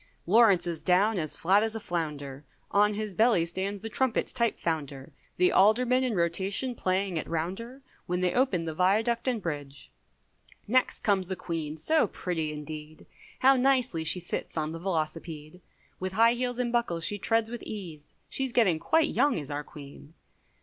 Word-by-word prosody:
Lawrence 195 Hz, -2 st, +5 dB
is 170 Hz, -2 st, -4 dB
down 195 Hz, +3 st, +3 dB
as 155 Hz, -2 st, -3 dB
flat 195 Hz, +5 st, +3 dB
as 225 Hz, 0 st, -1 dB
a -, -, -3 dB
flounder, 150 Hz, -7 st, -4 dB, 0.3 s
On 210 Hz, +1 st, +3 dB
his 210 Hz, -1 st, -4 dB
belly 220 Hz, -4 st, +3 dB
stands 190 Hz, +4 st, -4 dB
the -, -, -3 dB
trumpet 245 Hz, +2 st, 0 dB
type 235 Hz, -3 st, -1 dB
founder, 145 Hz, -5 st, -4 dB, 0.2 s
The 180 Hz, -, +4 dB
Aldermen 250 Hz, +6 st, +4 dB
in 245 Hz, -4 st, -1 dB
rotation 190 Hz, +8 st, -1 dB
playing 185 Hz, -4 st, -1 dB
at -, -, -7 dB
rounder, 195 Hz, +11 st, -4 dB, 0.2 s
When 180 Hz, +1 st, -1 dB
they 180 Hz, -1 st, +1 dB
open 245 Hz, -10 st, +1 dB
the 160 Hz, -, -3 dB
Viaduct 220 Hz, +8 st, +1 dB
and 245 Hz, -3 st, +1 dB
Bridge. 145 Hz, -6 st, -6 dB, 0.8 s
Next 255 Hz, +4 st, +1 dB
comes 195 Hz, -4 st, +1 dB
the 190 Hz, -, -3 dB
Queen, 160 Hz, -4 st, -4 dB
so 310 Hz, -, +3 dB
pretty 165 Hz, -4 st, -3 dB
indeed, 150 Hz, +1 st, -8 dB, 0.4 s
How 270 Hz, +1 st, +6 dB
nicely 255 Hz, -9 st, +2 dB
she 170 Hz, +3 st, +3 dB
sits 175 Hz, -1 st, -5 dB
on 155 Hz, 0 st, -1 dB
the 165 Hz, -, -6 dB
velocipede, 160 Hz, -1 st, -4 dB, 0.4 s
With 185 Hz, 0 st, -4 dB
high 230 Hz, +3 st, +5 dB
heels 245 Hz, 0 st, -2 dB
and 245 Hz, -1 st, -1 dB
buckles 175 Hz, -9 st, 0 dB
she 205 Hz, +3 st, -2 dB
treads 225 Hz, +2 st, +1 dB
with 240 Hz, -, -6 dB
ease, 170 Hz, -8 st, -8 dB
She's 265 Hz, -1 st, -2 dB
getting 200 Hz, -10 st, +3 dB
quite 320 Hz, -, +2 dB
young 275 Hz, -1 st, +2 dB
is 145 Hz, -3 st, -6 dB
our 145 Hz, +1 st, -3 dB
Queen. 145 Hz, +2 st, -13 dB
185 Hz, 175 wpm, -28 LUFS, 160-230 Hz, 0.8 s, How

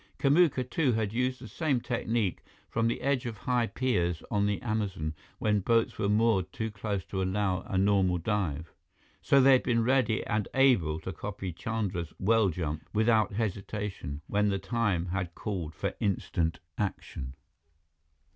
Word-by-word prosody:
Kamuka, 145 Hz, -2 st, +4 dB
too, 130 Hz, -1 st, +1 dB
had 110 Hz, -2 st, -1 dB
used 125 Hz, +2 st, 0 dB
the 125 Hz, -, -9 dB
same 140 Hz, +3 st, 0 dB
technique 115 Hz, -5 st, -1 dB, 0.3 s
from 115 Hz, +1 st, +1 dB
the 115 Hz, -, -1 dB
edge 135 Hz, -2 st, 0 dB
of 115 Hz, -3 st, -5 dB
high 120 Hz, +3 st, +1 dB
piers 90 Hz, -12 st, 0 dB
on 100 Hz, 0 st, +2 dB
the 105 Hz, -1 st, 0 dB
Amazon, 100 Hz, -9 st, -2 dB, 0.2 s
when 105 Hz, -1 st, +2 dB
boats 115 Hz, +3 st, +1 dB
were 100 Hz, -, +1 dB
moored 105 Hz, -3 st, +2 dB
too 110 Hz, 0 st, -3 dB
close 105 Hz, -2 st, -3 dB
to 95 Hz, -, -3 dB
allow 95 Hz, 0 st, 0 dB
a 95 Hz, -, -1 dB
normal 95 Hz, -2 st, +3 dB
dive. 85 Hz, -5 st, -2 dB, 0.5 s
So 140 Hz, -, +4 dB
they 135 Hz, +1 st, +7 dB
had 130 Hz, -, +6 dB
been 115 Hz, -2 st, +1 dB
ready 120 Hz, -3 st, +2 dB
and 105 Hz, -1 st, -1 dB
able 100 Hz, -, +4 dB
to 95 Hz, +3 st, -5 dB
copy 95 Hz, 0 st, -5 dB
Chandra's 95 Hz, -4 st, -3 dB
well 110 Hz, +1 st, +3 dB
jump 80 Hz, -3 st, -4 dB
without 110 Hz, -1 st, +3 dB
hesitation, 100 Hz, -7 st, -3 dB
when 105 Hz, 0 st, +1 dB
the 100 Hz, -, +1 dB
time 105 Hz, -6 st, 0 dB
had 90 Hz, -1 st, -3 dB
called 85 Hz, -7 st, -4 dB
for -, -, -2 dB
instant 85 Hz, -4 st, 0 dB, 0.2 s
action. 70 Hz, -9 st, -4 dB
105 Hz, 160 wpm, -29 LUFS, 95-115 Hz, 0.5 s, they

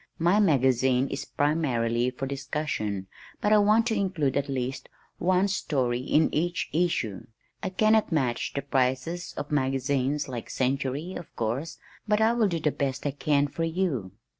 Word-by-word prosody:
My 175 Hz, +5 st, +3 dB
magazine 130 Hz, -, +3 dB
is 140 Hz, -, -4 dB
primarily 125 Hz, -6 st, +1 dB
for 130 Hz, +1 st, -5 dB
discussion 135 Hz, -8 st, -3 dB, 0.3 s
but 210 Hz, -, +2 dB
I 210 Hz, -, +7 dB
want 215 Hz, +2 st, +4 dB
to 230 Hz, -2 st, 0 dB
include 185 Hz, -9 st, 0 dB
at 140 Hz, 0 st, 0 dB
least 130 Hz, -1 st, -3 dB, 0.3 s
one 185 Hz, +2 st, +3 dB
story 130 Hz, -10 st, 0 dB
in 150 Hz, +5 st, +2 dB
each 175 Hz, +2 st, -1 dB
issue. 155 Hz, -, 0 dB, 0.3 s
I 190 Hz, -, -2 dB
cannot 215 Hz, +3 st, +3 dB
match 130 Hz, -7 st, 0 dB
the 140 Hz, -, -2 dB
prices 135 Hz, +5 st, -1 dB
of 145 Hz, -, -5 dB
magazines 135 Hz, +1 st, 0 dB
like 125 Hz, -3 st, -5 dB
the -, -, -9 dB
Century 135 Hz, +6 st, -1 dB
of 175 Hz, -, -9 dB
course, 120 Hz, +8 st, -2 dB, 0.3 s
but 210 Hz, 0 st, +3 dB
I 220 Hz, +1 st, +4 dB
will 235 Hz, -3 st, +3 dB
do 170 Hz, -3 st, -1 dB
the 150 Hz, -1 st, +1 dB
best 135 Hz, -1 st, -3 dB
I 145 Hz, -, +1 dB
can 145 Hz, +1 st, +1 dB
for 165 Hz, +4 st, -4 dB
you." 165 Hz, -, -1 dB
145 Hz, 165 wpm, -27 LUFS, 130-175 Hz, 0.3 s, I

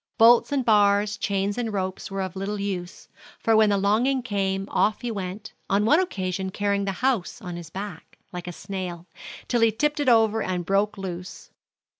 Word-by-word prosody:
Bolts 235 Hz, +3 st, +6 dB
and 275 Hz, -3 st, 0 dB
bars, 205 Hz, -1 st, +4 dB
chains 200 Hz, +1 st, -1 dB
and 230 Hz, -2 st, -2 dB
ropes 190 Hz, -2 st, -3 dB
were 195 Hz, 0 st, -2 dB
of 185 Hz, -1 st, -6 dB
little 200 Hz, +2 st, -3 dB
use; 185 Hz, -3 st, -5 dB, 0.3 s
for 225 Hz, -, +2 dB
when 215 Hz, -1 st, +5 dB
the 200 Hz, -, +2 dB
longing 235 Hz, +7 st, +2 dB
came, 195 Hz, -4 st, -1 dB
off 215 Hz, -, +1 dB
he 240 Hz, -, -3 dB
went, 195 Hz, 0 st, -6 dB, 0.2 s
on 200 Hz, +2 st, +2 dB
one 300 Hz, +9 st, +5 dB
occasion 190 Hz, -, -2 dB
carrying 200 Hz, +1 st, 0 dB
the 195 Hz, -, 0 dB
house 245 Hz, -9 st, 0 dB
on 180 Hz, -2 st, -7 dB
his 170 Hz, -2 st, -8 dB
back, 200 Hz, +3 st, -8 dB, 0.2 s
like 180 Hz, 0 st, -6 dB
a -, -, -3 dB
snail, 180 Hz, -2 st, -6 dB, 0.4 s
till 240 Hz, -2 st, +1 dB
he 230 Hz, -1 st, +5 dB
tipped 295 Hz, +7 st, 0 dB
it 285 Hz, -3 st, +2 dB
over 225 Hz, -2 st, +4 dB
and 180 Hz, -3 st, -2 dB
broke 200 Hz, +3 st, +1 dB
loose. 185 Hz, -2 st, -7 dB
200 Hz, 190 wpm, -25 LUFS, 190-225 Hz, 0.4 s, Bolts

